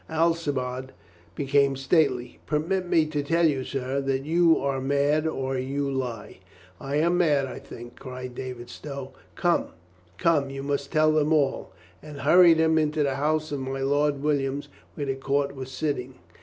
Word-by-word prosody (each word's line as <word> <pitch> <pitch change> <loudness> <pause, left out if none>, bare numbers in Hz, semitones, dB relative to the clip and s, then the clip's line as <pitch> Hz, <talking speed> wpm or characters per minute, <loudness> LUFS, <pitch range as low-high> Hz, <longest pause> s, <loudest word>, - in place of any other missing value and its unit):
Alcibiade 145 -6 -1 0.4
became 140 +1 +2
stately. 135 -2 +1
"Permit 175 +5 0
me 165 -2 +3
to 155 -1 -2
tell 165 +4 +2
you, 140 -4 +1
sir, 135 +1 -2
that 135 -1 -1
you 165 +1 +4
are 135 -1 -1
mad 145 +3 +1
or 135 -3 -2
you 140 +2 -2
lie." 125 -8 -4 0.4
"I 140 +1 -4
am 170 +4 +2
mad, 145 -6 +3
I 130 - -7
think," 120 +1 -11
cried 130 -1 -7
David 125 -1 -7
Stow. 140 -3 -7 0.2
"Come, - - +1 0.5
come, 160 -6 +2
you 135 0 -6
must 140 0 -2
tell 155 -1 +4
them 155 0 +2
all," 145 -4 +1 0.3
and 150 -2 -9
hurried 170 +3 +6
him 160 0 +3
into 150 0 +1
the 135 -1 -1
house 155 +2 0
of 145 - -2
my 135 0 -4
Lord 145 +1 +1
Williams, 140 -1 -1 0.3
where 145 - -3
the 135 - -1
court 140 +1 -1
was 130 -1 -7
sitting. 130 -1 -3
140 Hz, 170 wpm, -26 LUFS, 135-155 Hz, 0.5 s, hurried